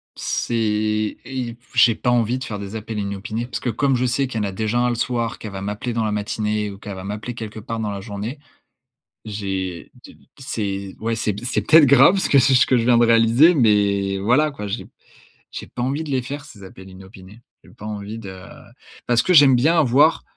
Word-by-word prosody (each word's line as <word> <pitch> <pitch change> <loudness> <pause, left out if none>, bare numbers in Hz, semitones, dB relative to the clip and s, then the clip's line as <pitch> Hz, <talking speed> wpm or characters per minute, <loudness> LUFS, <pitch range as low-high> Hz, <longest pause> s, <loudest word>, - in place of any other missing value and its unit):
c'est - - -3
et 110 -1 0
ip 125 -3 -5
j'ai 115 -3 +5
pas 125 - 0
envie 120 +1 +1
de 130 - -6
faire 105 -2 -6
des 100 +1 -7
appels 110 0 -5
inopinés. 105 +4 -4
Parce 120 - -5
que 120 - -2
comme 135 +4 +1
je 125 +1 0
sais 130 +3 0
qu'il 115 -3 -4
y - - -1
en - - -1
a - - -4
déjà 110 +4 -1
1 125 - +2
le 120 - -1
soir, 120 -1 -2
qu'elle 110 - -7
va 95 0 -7
m'appeler 105 +5 -4
dans 115 -1 -1
la 105 - -1
matinée 105 0 -2
ou 100 - -9
qu'elle 100 0 -8
va 95 - -8
m'appeler 105 +5 -5
quelque 110 -1 -8
part 115 +1 -5
dans 110 -1 -2
la 100 -1 -5
journée. 105 +6 -6 0.9
J'ai 95 -4 -5
de - - -12
t - - -22 0.2
c'est 100 -6 -4
ouais 115 +1 -2
c'est 105 -2 -2
c'est 125 - 0
peut-être 160 0 +6
grave 140 +8 +6
ce - - 0
que 140 - +5
je 135 - +4
ce 125 - +5
que 130 - +2
je 115 - 0
viens 120 -1 +4
de 120 - +5
réaliser, 115 +9 +5
mais 100 -6 +2
voilà 125 +10 +2
quoi. 105 -8 -7
J'ai 100 +3 -5 0.7
j'ai - - -8
pas 120 - -7
envie 140 +5 -2
de 155 - -8
les 130 -2 0
faire 140 +3 -7
ces 100 -6 -14
appels 95 0 -12
inopinés. 95 +2 -14 0.2
J'ai - - -18
pas 105 - -12
envie 105 +1 -6
de 95 -4 -9 0.7
parce 120 -1 +3
que 185 - -1
j'aime 140 -5 +7
bien 155 +8 +3
avoir 145 +3 +3
115 Hz, 235 wpm, -21 LUFS, 100-125 Hz, 0.9 s, j'aime